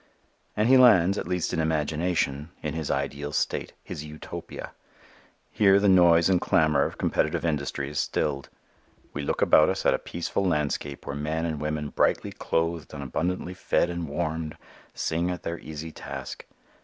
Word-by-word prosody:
And 105 +2 +3
he 130 +1 +7
lands, 100 -6 +6
at - - -5
least 90 -2 -1
in - - 0
imagination, 80 -1 0
in 75 - -2
his 80 -2 -3
ideal 70 +1 -2
state, - - -1
his 75 - -6
Utopia. 75 0 -8 0.8
Here 100 -1 +5
the 100 - +2
noise 85 -3 +6
and 95 -2 +3
clamor 75 -4 +3
of - - -5
competitive 80 +1 0
industry 70 -3 -1
is 75 +1 -3
stilled. 70 -2 -1 0.6
We 75 - -3
look 70 - 0
about - - +6
us - - -2
at - - +5
a - - 0
peaceful 85 +3 -3
landscape 75 -5 -1
where 70 - -4
men 75 +3 -2
and 80 -3 -3
women 75 -1 -2
brightly - - +1
clothed 80 -1 -2
and 70 - -5
abundantly 90 +6 -2
fed 90 -1 +1
and 85 -3 -4
warmed, 80 0 -3 0.4
sing 85 +2 -1
at 90 -1 -4
their 85 0 -4
easy 80 +1 -7
task. - - -8
80 Hz, 170 wpm, -26 LUFS, 75-85 Hz, 0.8 s, he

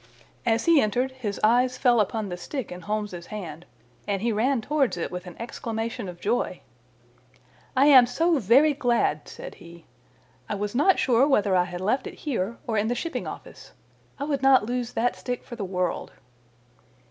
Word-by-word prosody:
As 225 0 +2
he 330 -4 +6
entered 245 +5 0
his 235 -6 -5
eyes 245 +3 +3
fell 245 -3 +4
upon 210 0 -1
the 180 - -4
stick 250 +7 -6
in 180 0 -7
Holmes's 210 -3 -4
hand, 175 -6 -7 0.4
and 200 -1 -1
he 235 - +1
ran 240 +5 +1
towards 275 -3 0
it 170 - -3
with 180 0 -6
an 175 - -9
exclamation 230 -2 -4
of 175 -1 -10
joy. 230 +6 -1 1.2
"I 270 - +6
am 260 -4 +8
so 325 +5 +2
very 265 +8 +5
glad," 235 - 0
said - - -9
he. 170 -1 -13 0.6
"I - - -1
was 205 0 -3
not 365 +10 +4
sure 255 +2 +3
whether 205 -9 +2
I 180 -1 +3
had 180 0 -7
left 220 +8 0
it - - -8
here 235 -6 -3
or 220 -2 0
in 210 - 0
the 240 - 0
Shipping 335 +6 -4
Office. - - -10 0.4
I - - -4
would 285 -2 -1
not 270 -5 +5
lose 245 +1 -3
that 245 +2 0
stick 250 -1 -5
for 240 - -9
the 225 - -5
world." 180 -2 -2
230 Hz, 185 wpm, -25 LUFS, 200-260 Hz, 1.2 s, am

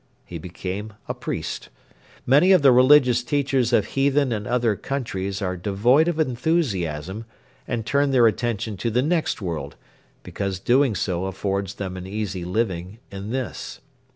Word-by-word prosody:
He 85 - -7
became 95 +5 -6
a - - -2
priest. - - -5 0.6
Many 145 +9 +5
of 180 -6 +4
the 135 - +8
religious 125 -1 +5
teachers 135 -2 0
of 105 -4 +3
heathen 140 -1 +1
and 105 -2 -3
other 120 -3 +1
countries 100 -7 -4
are 90 -1 -1
devoid 110 - +2
of 170 -2 -1
enthusiasm 115 - -1 0.4
and 115 -2 -3
turn 140 +4 +2
their 130 -3 +4
attention 110 -2 0
to 115 - -1
the 125 +3 +1
next 160 - 0
world 75 -5 -4 0.5
because 100 -2 -3
doing 125 +4 +2
so 90 0 -1
affords 95 0 -3
them 95 -2 -5
an 90 0 -7
easy 100 -3 -4
living 95 0 -2
in 100 +1 -6
this. 120 -4 -4
110 Hz, 155 wpm, -23 LUFS, 95-130 Hz, 0.6 s, the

